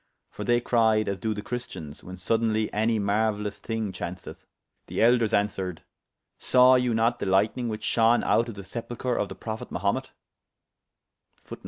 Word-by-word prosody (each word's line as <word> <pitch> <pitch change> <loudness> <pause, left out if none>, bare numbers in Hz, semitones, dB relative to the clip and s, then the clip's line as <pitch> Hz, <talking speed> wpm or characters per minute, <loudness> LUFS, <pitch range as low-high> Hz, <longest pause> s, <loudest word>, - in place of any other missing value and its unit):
For - - -6
they 120 0 +3
cryed 110 -3 +2
as 100 -1 -2
doe 110 +2 -2
the 105 - -6
Christians, 95 -12 -7
when 90 +1 -9
sodeynly 110 +3 0
any 110 +2 +1
marueylous 105 0 0
thyng 110 -4 -3
chaunceth. 90 0 -7 0.4
The - - -4
Elders 115 -1 +4
answered, 95 -4 -1 0.6
Sawe 125 0 +5
you 125 -2 +2
not 115 +2 +1
the - - -3
lyghtning 105 +6 +1
whiche 110 -1 -4
shone 115 +1 +3
out 115 +1 +2
of 115 - -7
the 100 - -8
sepulchre 120 +4 -4
of - - -1
the - - -7
Prophet 110 -1 -6
Mahumet[FN#17]? - - -2
110 Hz, 160 wpm, -26 LUFS, 100-120 Hz, 0.6 s, Sawe